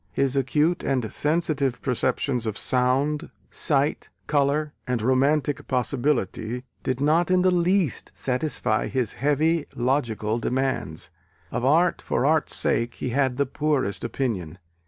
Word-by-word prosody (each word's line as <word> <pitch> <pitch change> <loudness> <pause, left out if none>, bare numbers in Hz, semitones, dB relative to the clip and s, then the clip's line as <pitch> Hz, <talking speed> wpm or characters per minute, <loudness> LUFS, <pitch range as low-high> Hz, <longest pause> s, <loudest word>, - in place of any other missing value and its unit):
His 135 -1 +1
acute 150 +6 +1
and 125 -6 -1
sensitive 150 -5 0
perceptions 125 -1 -1
of 110 -1 -3
sound, 135 +5 +1 0.2
sight, 145 -1 +1 0.2
colour 145 +1 +1
and 125 -2 0
romantic 135 +4 +1
possibility 125 -3 -1 0.2
did 130 -1 -2
not 160 +5 +2
in 185 0 +3
the 185 - +4
least 180 -3 +1
satisfy 125 -4 -1
his 125 -4 -1
heavy 150 +3 +1
logical 120 -4 0
demands. 125 - -2 0.4
Of 120 - -2
art 165 +7 +3
for - - -1
art's 155 +1 +2
sake 120 +1 0
he - - -4
had 130 0 +1
the 140 - +2
poorest 140 -6 -1
opinion. 95 - -3
135 Hz, 130 wpm, -25 LUFS, 125-150 Hz, 0.4 s, the